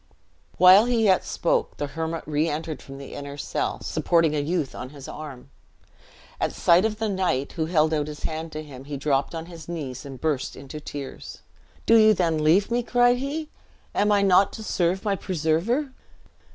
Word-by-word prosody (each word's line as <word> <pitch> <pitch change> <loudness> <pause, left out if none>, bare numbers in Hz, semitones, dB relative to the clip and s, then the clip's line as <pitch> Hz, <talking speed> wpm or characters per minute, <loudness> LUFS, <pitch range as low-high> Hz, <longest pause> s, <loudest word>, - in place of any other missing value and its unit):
While 185 +4 +8
he 240 -2 +1
yet 190 -3 +4
spoke, - - -1
the 145 - -2
hermit 160 +3 -4
re 155 +2 0
entered 155 +1 -4
from 135 0 -10
the 140 -1 -9
inner 140 0 -7
cell, - - -3
supporting 165 -3 +2
a - - +1
youth 155 -1 -1
on 125 - -7
his 140 -1 -11
arm. 145 -5 -9 0.9
At - - -1
sight 175 +4 +4
of 215 -1 -1
the 220 0 -1
knight, 185 -9 -1
who 160 -2 -2
held 160 -2 +2
out 150 -1 0
his 150 -1 -8
hand 160 +1 -4
to 155 0 -5
him, 135 -3 -11
he 145 0 -5
dropped 140 +2 0
on 165 0 -5
his 170 -2 -11
knees 140 -7 -5
and 135 -2 -9
burst 150 -4 -1
into 140 +2 -8
tears. 145 -2 -8 0.4
"Do 230 - +6
you 215 -1 +6
then 165 -4 +1
leave 185 +8 +3
me?" 240 +1 +2
cried 245 0 +3
he; 295 +4 -4 0.4
"am 210 +1 +2
I 200 -1 +4
not 195 0 +5
to 220 - -7
serve 185 -1 0
my 200 -1 +1
preserver?" 185 - 0
165 Hz, 190 wpm, -25 LUFS, 145-200 Hz, 0.9 s, While